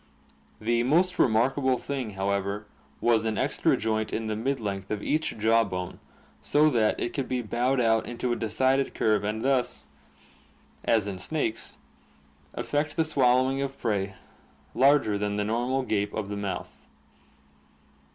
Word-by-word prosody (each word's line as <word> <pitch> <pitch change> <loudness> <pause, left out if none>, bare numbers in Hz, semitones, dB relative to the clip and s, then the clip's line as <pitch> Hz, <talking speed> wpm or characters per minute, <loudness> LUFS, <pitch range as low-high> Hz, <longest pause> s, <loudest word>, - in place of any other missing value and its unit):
The 120 +2 +1
most 175 +9 +2
remarkable 130 +3 +3
thing, 130 -5 -4
however, 100 +1 -1 0.4
was 115 -2 +3
an 110 -2 -1
extra - - +1
joint 110 0 -1
in 115 - -2
the 110 -1 -2
mid 135 +5 -1
length 100 -3 -4
of 105 -1 -3
each 155 -5 -1
jaw 115 +2 +4
bone 90 -3 -5 0.4
so 150 +1 +3
that 110 -4 +2
it 120 - -2
could 135 -3 -2
be 125 -1 -1
bowed 125 +4 0
out 115 -2 +2
into 120 0 -2
a - - 0
decided 130 +5 +1
curve 105 -2 +2
and 110 +3 -2
thus, 135 -2 0 1.0
as 110 -3 +2
in 100 -2 -5
snakes, 115 - -3 0.8
effect 150 +1 -1
the 160 - +2
swallowing 130 -2 +2
of 135 0 -4
prey 100 -4 -1 0.6
larger 135 -7 +4
than 105 0 -1
the 105 - 0
normal 120 +5 0
gape 105 -4 -1
of 105 -2 -3
the 105 - -3
mouth. 100 -1 -5
115 Hz, 150 wpm, -27 LUFS, 105-130 Hz, 1.0 s, jaw